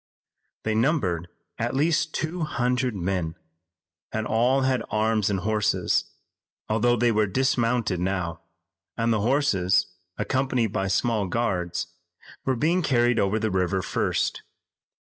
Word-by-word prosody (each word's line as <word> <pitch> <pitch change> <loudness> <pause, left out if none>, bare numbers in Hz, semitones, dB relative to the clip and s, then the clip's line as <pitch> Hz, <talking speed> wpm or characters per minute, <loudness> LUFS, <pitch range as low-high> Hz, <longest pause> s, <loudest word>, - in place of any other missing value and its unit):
They 110 - 0
numbered 110 - +1 0.3
at 120 +3 -1
least 155 +2 +2
two 170 +3 -2
hundred 125 -5 0
men, 90 -3 -2 0.8
and 110 0 -2
all 125 +5 +2
had 130 -2 +1
arms 110 -1 +1
and 95 -3 -1
horses, 105 +1 +1 0.6
although 115 +3 +2
they 120 0 +2
were 110 -1 +2
dismounted 115 -3 +1
now, 90 -3 -2 0.6
and 115 0 +2
the 110 - 0
horses, 105 -7 +2 0.3
accompanied 130 -5 0
by 95 -2 0
small 105 +1 +1
guards, 90 -5 -1 0.6
were 130 - +1
being 165 +9 +2
carried 120 -5 +2
over 100 +2 +2
the 110 -1 -1
river 95 0 0
first. - - -1
110 Hz, 125 wpm, -25 LUFS, 95-125 Hz, 0.8 s, least